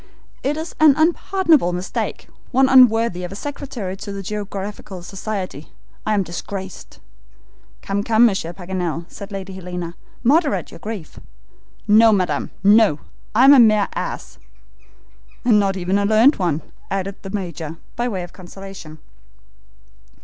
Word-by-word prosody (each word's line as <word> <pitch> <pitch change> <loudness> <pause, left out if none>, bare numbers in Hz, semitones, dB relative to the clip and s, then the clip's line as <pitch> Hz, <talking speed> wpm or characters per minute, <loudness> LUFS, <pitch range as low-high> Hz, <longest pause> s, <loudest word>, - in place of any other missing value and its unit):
It 290 +3 -1
is 320 +1 -5
an 310 -3 +7
unpardonable 325 - +2
mistake, 180 +1 -4 0.2
one 265 +1 +4
unworthy 230 -7 +5
of 180 - -5
a - - -7
secretary 255 -6 -5
of 195 - -10
the 200 -1 -6
Geographical 200 -2 -6
Society. 190 -5 -5 0.4
I 215 - +2
am 200 - +2
disgraced!" 190 +2 -7 0.9
"Come, 200 +1 -1
come, 225 +1 +5
Monsieur 190 -7 0
Paganel," 175 -2 -4
said 200 0 -10
Lady 195 -1 -6
Helena; 180 -2 -6 0.3
"moderate 290 +4 +2
your - - -11
grief." 210 -7 -7 0.7
"No, 220 +2 +7
madam, 185 -4 0
no; 205 -6 +5 0.3
I 250 +4 +6
am 280 - +9
a 275 - +7
mere 215 -3 +5
ass!" - - -5 1.1
"And 225 -4 +5
not 195 -1 +1
even 185 +2 0
a 200 - +1
learned 225 +7 +5
one!" 170 -5 -1 0.3
added 195 0 -3
the 195 - -8
Major, 170 -5 -5 0.2
by 240 +1 -1
way 190 -6 -3
of 175 - -10
consolation. 190 -3 -10
200 Hz, 140 wpm, -20 LUFS, 185-230 Hz, 1.1 s, am